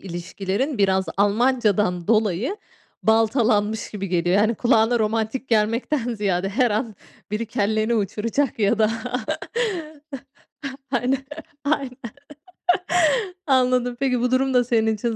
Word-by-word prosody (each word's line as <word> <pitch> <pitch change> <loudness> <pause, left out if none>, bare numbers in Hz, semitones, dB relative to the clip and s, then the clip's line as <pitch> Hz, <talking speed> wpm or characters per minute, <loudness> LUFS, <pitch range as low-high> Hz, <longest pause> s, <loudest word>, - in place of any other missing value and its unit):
ilişkilerin 195 - -3
biraz 190 -1 +2
Almancadan 205 -4 +2
dolayı 220 - +1 0.5
baltalanmış 220 -1 +2
gibi 200 -2 -5
geliyor. 175 +1 +1
Yani 215 +3 +3
kulağına 235 0 +3
romantik 220 +4 -1
gelmekten 230 +3 0
ziyade 195 -3 -1
her 235 +4 +1
an 220 +1 -2 0.4
biri 215 +2 -2
kelleni 220 0 0
uçuracak 225 +6 -1
ya 215 +1 +2
da 215 0 +3 2.0
Aynen, 250 +2 +1 0.5
aynen. 280 -3 -1 1.5
Anladım. 250 -2 +2
Peki 260 -2 +1
bu 250 +1 0
durum 265 +1 +2
da 250 -1 +4
senin 220 -2 +1
için 230 +2 -2
220 Hz, 110 wpm, -22 LUFS, 205-245 Hz, 2.0 s, da